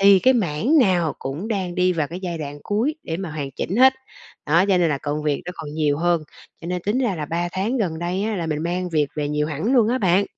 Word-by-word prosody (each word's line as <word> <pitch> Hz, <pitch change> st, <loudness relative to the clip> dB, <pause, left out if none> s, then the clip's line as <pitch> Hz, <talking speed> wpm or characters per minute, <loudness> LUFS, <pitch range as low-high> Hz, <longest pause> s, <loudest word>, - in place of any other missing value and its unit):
thì 195 Hz, -1 st, +7 dB
cái 260 Hz, +6 st, +4 dB
mảng 220 Hz, -, +2 dB
nào 180 Hz, -, +3 dB
cũng 150 Hz, +11 st, -5 dB
đang 190 Hz, -5 st, -2 dB
đi 180 Hz, 0 st, +2 dB
vào 155 Hz, -4 st, -1 dB
cái 175 Hz, +3 st, -7 dB
giai 175 Hz, -3 st, -4 dB
đoạn 145 Hz, -1 st, -6 dB
cuối 230 Hz, +9 st, 0 dB
để 165 Hz, -, -3 dB
mà 190 Hz, -2 st, -5 dB
hoàn 145 Hz, -3 st, -4 dB
chỉnh 180 Hz, -, -3 dB
hết, 260 Hz, +1 st, +7 dB, 0.5 s
đó, 170 Hz, +5 st, +4 dB
cho 185 Hz, -2 st, +4 dB
nên 170 Hz, -, +3 dB
là 145 Hz, -3 st, 0 dB
công 150 Hz, +1 st, -3 dB
việc 150 Hz, -2 st, -1 dB
nó 180 Hz, -, -5 dB
còn 145 Hz, -1 st, -7 dB
nhiều 150 Hz, -2 st, +1 dB
hơn. 175 Hz, -1 st, +2 dB, 0.4 s
Cho 165 Hz, -, -8 dB
nên 180 Hz, 0 st, -3 dB
tính 210 Hz, +6 st, 0 dB
ra 240 Hz, -7 st, +1 dB
là 150 Hz, -3 st, -4 dB
3 170 Hz, +2 st, -1 dB
tháng 205 Hz, +8 st, -1 dB
gần 165 Hz, -7 st, -1 dB
đây, 175 Hz, +3 st, -2 dB
á, 215 Hz, 0 st, -1 dB
là 170 Hz, -3 st, -2 dB
mình 155 Hz, 0 st, -2 dB
mang 180 Hz, +2 st, -2 dB
việc 155 Hz, -4 st, +1 dB
về 145 Hz, -1 st, -2 dB
nhiều 150 Hz, 0 st, 0 dB
hẳn 160 Hz, -, -1 dB
luôn 230 Hz, -4 st, +5 dB
á 255 Hz, +2 st, +1 dB
bạn. 190 Hz, -1 st, +3 dB
175 Hz, 270 wpm, -22 LUFS, 155-200 Hz, 0.5 s, thì